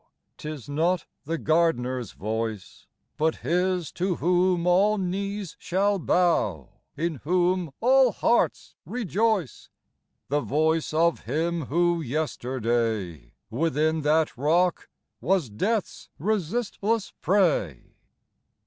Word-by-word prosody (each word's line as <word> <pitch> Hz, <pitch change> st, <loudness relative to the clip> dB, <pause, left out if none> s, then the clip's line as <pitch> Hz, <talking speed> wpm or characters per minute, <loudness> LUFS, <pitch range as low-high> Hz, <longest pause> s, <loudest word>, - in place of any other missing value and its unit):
" -, -, -52 dB
'Tis 150 Hz, -5 st, -7 dB
not 165 Hz, +4 st, 0 dB, 0.2 s
the 165 Hz, +3 st, -2 dB
gardener's 130 Hz, -, 0 dB
voice, 110 Hz, -1 st, -5 dB, 0.3 s
But 160 Hz, +1 st, +1 dB
His 180 Hz, +2 st, 0 dB
to 180 Hz, 0 st, -1 dB
whom 180 Hz, 0 st, +2 dB
all 195 Hz, +4 st, +4 dB
knees 195 Hz, 0 st, -3 dB
shall 195 Hz, +3 st, +1 dB
bow, 105 Hz, -, +1 dB, 0.3 s
In 165 Hz, 0 st, -1 dB
whom 180 Hz, +2 st, 0 dB
all 260 Hz, +1 st, +5 dB
hearts 235 Hz, +3 st, +1 dB
rejoice; 215 Hz, -, -1 dB, 0.6 s
The 145 Hz, +2 st, 0 dB
voice 155 Hz, +3 st, +1 dB
of 165 Hz, +1 st, +1 dB
Him 160 Hz, +4 st, -1 dB
who 170 Hz, +2 st, +1 dB
yesterday 115 Hz, -, -2 dB, 0.2 s
Within 155 Hz, +4 st, +1 dB
that 155 Hz, +1 st, +2 dB
rock 170 Hz, +7 st, +1 dB, 0.3 s
was 180 Hz, -, +1 dB
Death's 210 Hz, -, -2 dB
resistless 215 Hz, -, -1 dB
prey. 170 Hz, -, +1 dB
165 Hz, 105 wpm, -26 LUFS, 145-185 Hz, 0.6 s, all